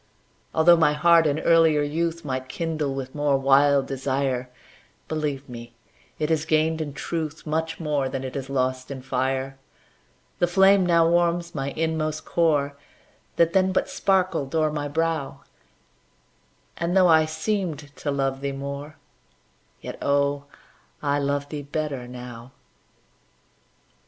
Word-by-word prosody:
Altho' 170 +2 +7
my 160 -3 +4
heart 165 +1 +5
in 145 0 0
earlier 160 -3 +4
youth 165 +2 -2
Might 130 -1 -4
kindle 155 -3 -2
with 130 -1 -6
more 145 -2 +1
wild 140 +1 +4
desire, 135 -1 -2 0.6
Believe 150 -3 -3
me, 120 -1 -10 0.4
it 155 +1 -1
has 155 -2 +1
gained 160 0 +1
in 145 -3 -4
truth 160 +1 -4
Much 160 +1 -2
more 145 -4 -1
than 135 0 -4
it 130 - -5
has 135 -1 -5
lost 130 -1 -1
in 135 -2 -7
fire. 135 +1 -2 0.8
The 175 - +3
flame 190 +1 +5
now 170 -1 +4
warms 170 0 +1
my 135 -2 -3
inmost 155 0 -2
core, 145 -4 +1 0.6
That 170 0 +3
then 190 0 +3
but 185 - 0
sparkled 185 -7 0
o'er 155 -1 +2
my 145 -1 -3
brow, 160 -1 -2 1.4
And, 175 +2 0
though 185 -1 +6
I 160 -2 +5
seemed 155 -3 -3
to 145 - -4
love 135 -1 -1
thee 140 0 -2
more, 140 +2 -6 0.9
Yet, - - -7
oh, 140 0 +1 0.6
I 145 0 +1
love 145 0 -1
thee 150 -2 -5
better 145 -3 -4
now. 125 0 -10
145 Hz, 140 wpm, -24 LUFS, 135-165 Hz, 1.4 s, Altho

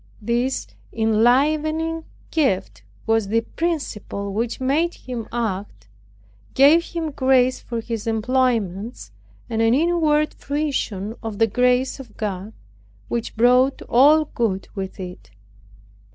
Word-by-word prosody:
This 240 +4 -1 0.3
enlivening 300 +9 +2 0.3
gift 190 - 0 0.2
was 225 -2 +2
the 225 +3 +2
principle 225 - -3
which 230 +3 -2
made 295 +7 +1
him 240 -3 -6
act, 200 - -4 0.7
gave 295 +5 +6
him 325 -2 -4
grace 260 -2 +3
for 235 -1 -5
his 230 -1 -5
employments, 225 -2 -1 0.4
and 225 -2 -1
an 225 +2 +4
inward 305 -1 +2
fruition 270 -9 -2
of 220 -3 -5
the 225 - +4
grace 250 +4 +1
of 240 -5 -12
God, 205 0 -4 0.6
which 235 -1 -3
brought 250 +3 +4
all 295 +5 +5
good 215 -9 -2
with 195 -2 -6
it. 180 -1 -8
240 Hz, 115 wpm, -22 LUFS, 220-280 Hz, 0.7 s, gave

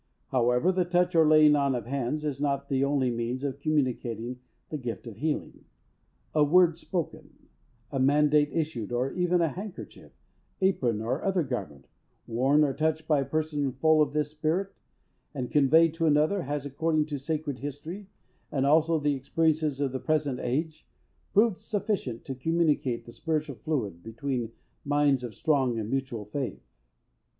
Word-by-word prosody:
However, 125 +6 +2
the 185 -1 +1
touch, 180 +1 +1
or 160 -2 +5
laying 155 -1 +6
on 140 -2 +1
of 120 - -4
hands, 140 +4 -2
is 140 -2 -3
not 140 -1 -1
the 135 0 +1
only 140 -3 +1
means 120 +3 -3
of 140 -1 -3
communicating 125 -5 -1 0.3
the 155 - -3
gift 120 -2 -5
of 115 -4 -9
healing. 150 +4 -3 0.7
A 150 - +4
word 170 +2 +4
spoken, 175 -3 -5 0.5
a 135 - -2
mandate 145 +2 +4
issued, 150 -9 -2
or 125 +2 0
even 180 -1 +1
a 165 - +2
handkerchief, 195 +5 -9 0.5
apron, 130 - +1
or 125 +6 -2
other 190 -3 +1
garment, 95 - -5 0.4
worn 135 +6 +3
or 140 -2 +1
touched 155 +2 -1
by 150 -3 +3
a 135 - -1
person 150 -3 -1
full 155 +4 +4
of 145 -2 +2
this 150 0 -1
Spirit, 160 +6 -1 0.6
and 125 -3 -4
conveyed 155 +3 +5
to 165 0 0
another, 155 +6 +3
has, 145 0 -3
according 155 +2 0
to 145 -2 -4
sacred 150 -1 -3
history, 155 +8 -7 0.4
and 135 -2 0
also 160 +3 +4
the 145 0 +1
experience 150 +1 0
of 140 -2 0
the 130 - -3
present 150 -4 0
age, 155 +5 -3 0.4
proved 210 -1 +3
sufficient 205 - -3
to 135 - -4
communicate 150 -3 0
the 120 - -11
spiritual 155 -1 -3
fluid, 105 - -3
between 115 +2 -4 0.3
minds 145 -2 +2
of 115 -4 -6
strong 135 - +1
and 110 0 -4
mutual 130 -5 -2
faith. 130 +5 -5
145 Hz, 160 wpm, -28 LUFS, 130-160 Hz, 0.7 s, laying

